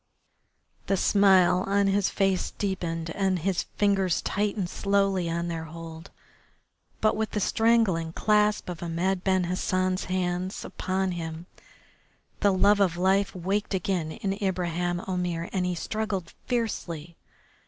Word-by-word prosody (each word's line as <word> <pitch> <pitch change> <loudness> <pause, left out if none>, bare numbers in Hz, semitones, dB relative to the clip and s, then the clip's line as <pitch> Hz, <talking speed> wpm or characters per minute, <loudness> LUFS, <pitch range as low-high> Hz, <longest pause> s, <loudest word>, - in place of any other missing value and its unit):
The 195 - +2
smile 190 -2 +4
on 200 0 +2
his 195 0 +2
face 195 -2 +1
deepened 165 -4 -3
and 190 0 +1
his 180 +2 -1
fingers 195 -3 +2
tightened 200 -2 -1
slowly 195 -3 +1
on 170 +1 -2
their 165 -1 -4
hold. 165 +1 -9 0.9
But 215 - +3
with 220 0 -1
the 210 - 0
strangling 215 -7 +2
clasp 210 +1 +2
of 175 -3 -6
Ahmed 175 +2 -1
Ben 190 -1 +2
Hassan's 185 +1 0
hands 185 0 -2
upon 190 0 -2
him 165 -1 -5 0.9
the 200 - +4
love 200 +2 +4
of 180 -4 +2
life 190 +2 +2
waked 195 +3 -1
again 180 -4 -1
in 195 -1 -2
Ibraheim 175 -2 -1
Omair 180 -2 -2
and 185 -2 0
he 180 - -1
struggled 200 -1 -3
fiercely. 175 - -3
185 Hz, 130 wpm, -27 LUFS, 175-200 Hz, 0.9 s, smile